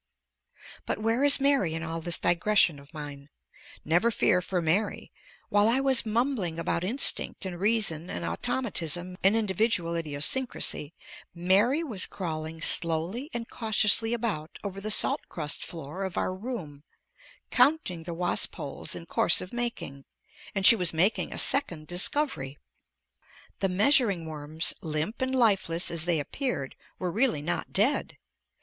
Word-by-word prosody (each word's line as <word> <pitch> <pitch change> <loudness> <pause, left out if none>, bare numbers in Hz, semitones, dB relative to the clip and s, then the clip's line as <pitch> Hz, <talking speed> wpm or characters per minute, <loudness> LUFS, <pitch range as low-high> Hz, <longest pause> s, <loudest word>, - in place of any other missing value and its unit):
But - - -1
where 225 +4 0
is 285 0 +7
Mary 270 - +1
in 165 - -5
all 165 0 -5
this 170 +1 +2
digression 175 -3 +2
of 140 +1 -17
mine? 145 -2 -9 0.6
Never 175 +9 +2
fear 185 -4 +2
for 180 0 -2
Mary. 175 +6 -1 0.4
While 205 0 +3
I 240 +4 +3
was 265 -4 +3
mumbling 215 -7 -1
about 170 0 -2
instinct 225 -1 -1
and 175 -2 -6
reason 195 -6 +1
and 85 - -4
automatism 175 - -3
and 195 +3 +4
individual 205 -4 0
idiosyncrasy, 165 - 0 0.4
Mary 200 - +2
was 220 - 0
crawling 160 -3 -6
slowly 170 - +1
and 235 -1 -5
cautiously 220 0 +2
about 210 -10 -4
over 195 -1 -6
the 215 - -4
salt 215 - +2
crust 150 -2 -3
floor 165 +3 -7
of 190 -2 -5
our 185 - -1
room, 185 - -7 0.7
counting 250 - +2
the 170 +1 -7
wasp 175 +1 +2
holes 140 - -4
in 165 - -8
course 170 - +2
of 185 - -8
making, 235 - -5 0.5
and 195 -1 -1
she 230 - +9
was 180 -5 0
making 190 +7 +2
a - - -6
second 175 - +1
discovery. 175 - -2 1.0
The 195 - 0
measuring 200 - +3
worms, 155 +1 -1
limp 160 +9 -4
and 260 0 -1
lifeless 195 -8 +3
as 165 -1 +3
they 170 -3 +1
appeared, 145 - -4 0.2
were 180 -1 -3
really 220 - +2
not 85 - -3
dead! - - +1
185 Hz, 145 wpm, -27 LUFS, 160-225 Hz, 1.0 s, she